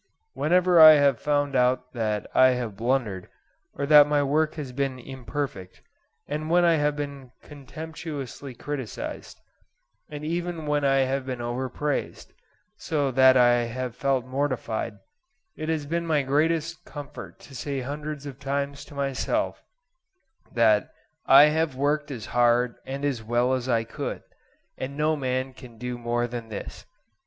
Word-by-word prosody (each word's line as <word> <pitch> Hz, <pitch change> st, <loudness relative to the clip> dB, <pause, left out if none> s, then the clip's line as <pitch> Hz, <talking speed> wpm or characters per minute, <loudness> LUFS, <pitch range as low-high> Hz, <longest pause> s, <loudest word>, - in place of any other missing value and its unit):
Whenever 180 Hz, +1 st, +3 dB
I 155 Hz, -1 st, +11 dB
have 140 Hz, -5 st, +3 dB
found 145 Hz, -1 st, 0 dB
out 125 Hz, 0 st, +1 dB
that 110 Hz, -3 st, -2 dB
I 130 Hz, 0 st, +6 dB
have 115 Hz, -5 st, -4 dB
blundered, 115 Hz, -5 st, -1 dB, 0.5 s
or 140 Hz, -, -2 dB
that 150 Hz, 0 st, +8 dB
my 145 Hz, -1 st, +2 dB
work 155 Hz, +3 st, +1 dB
has 145 Hz, -5 st, -6 dB
been 135 Hz, 0 st, -2 dB
imperfect, 130 Hz, -6 st, -6 dB, 0.4 s
and 155 Hz, +2 st, -4 dB
when 175 Hz, +1 st, +4 dB
I 165 Hz, -1 st, +4 dB
have 145 Hz, 0 st, +1 dB
been 140 Hz, -3 st, -6 dB
contemptuously 145 Hz, -2 st, -8 dB
criticised, 135 Hz, -3 st, -6 dB, 0.7 s
and 150 Hz, 0 st, -7 dB
even 170 Hz, 0 st, -3 dB
when 150 Hz, -1 st, 0 dB
I 135 Hz, -1 st, +3 dB
have 135 Hz, +1 st, -1 dB
been 130 Hz, -2 st, -4 dB
overpraised, 130 Hz, +4 st, -3 dB, 0.4 s
so 145 Hz, -4 st, -1 dB
that 130 Hz, 0 st, +6 dB
I 120 Hz, -1 st, +4 dB
have 125 Hz, +1 st, -5 dB
felt 135 Hz, -3 st, 0 dB
mortified, 130 Hz, -5 st, -2 dB, 0.6 s
it 155 Hz, +1 st, -5 dB
has 155 Hz, -3 st, -1 dB
been 170 Hz, +3 st, -2 dB
my 150 Hz, -3 st, +2 dB
greatest 160 Hz, +4 st, 0 dB
comfort 145 Hz, -2 st, -9 dB
to 140 Hz, -, -14 dB
say 135 Hz, +2 st, -4 dB
hundreds 145 Hz, +2 st, -5 dB
of 140 Hz, -2 st, -8 dB
times 140 Hz, 0 st, -3 dB
to 145 Hz, -, -14 dB
myself 140 Hz, -1 st, -2 dB, 0.9 s
that 110 Hz, -3 st, +3 dB, 0.4 s
"I 135 Hz, +2 st, +9 dB
have 160 Hz, -3 st, 0 dB
worked 145 Hz, +2 st, 0 dB
as 120 Hz, -6 st, -6 dB
hard 120 Hz, 0 st, +3 dB
and 135 Hz, +2 st, -4 dB
as 135 Hz, -5 st, -1 dB
well 120 Hz, +3 st, +1 dB
as 130 Hz, 0 st, -2 dB
I 115 Hz, -2 st, +2 dB
could, 115 Hz, -, -5 dB, 0.6 s
and 135 Hz, +2 st, -5 dB
no 155 Hz, +1 st, +2 dB
man 130 Hz, -1 st, -2 dB
can 125 Hz, -3 st, -13 dB
do 125 Hz, +1 st, -4 dB
more 120 Hz, 0 st, -1 dB
than 120 Hz, -1 st, -6 dB
this." 105 Hz, -, -8 dB
135 Hz, 150 wpm, -25 LUFS, 125-150 Hz, 0.9 s, I